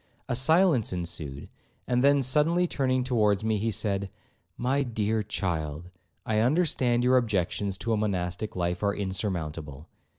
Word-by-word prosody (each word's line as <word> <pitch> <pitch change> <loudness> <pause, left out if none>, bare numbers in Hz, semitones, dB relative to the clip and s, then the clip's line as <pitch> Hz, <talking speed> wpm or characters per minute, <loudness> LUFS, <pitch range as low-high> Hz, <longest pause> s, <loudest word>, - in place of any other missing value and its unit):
A 125 - -1
silence 155 - +3
ensued, 85 -6 -5 0.4
and 125 0 +1
then 140 0 +4
suddenly 155 +7 +3
turning 130 -6 0
towards 110 -5 +1
me, 110 -1 +1
he 115 +3 0
said, 100 -2 -1 0.5
'My 130 +3 +1
dear 110 -4 -1
child, 85 -4 -3 0.3
I 110 -1 +1
understand 125 -2 +2
your 130 +1 +4
objections 100 -3 -1
to 115 - -1
a - - +1
monastic 95 -1 -2
life 90 0 -1
are 100 -1 +1
insurmountable. 85 -7 -4
110 Hz, 140 wpm, -27 LUFS, 90-125 Hz, 0.5 s, then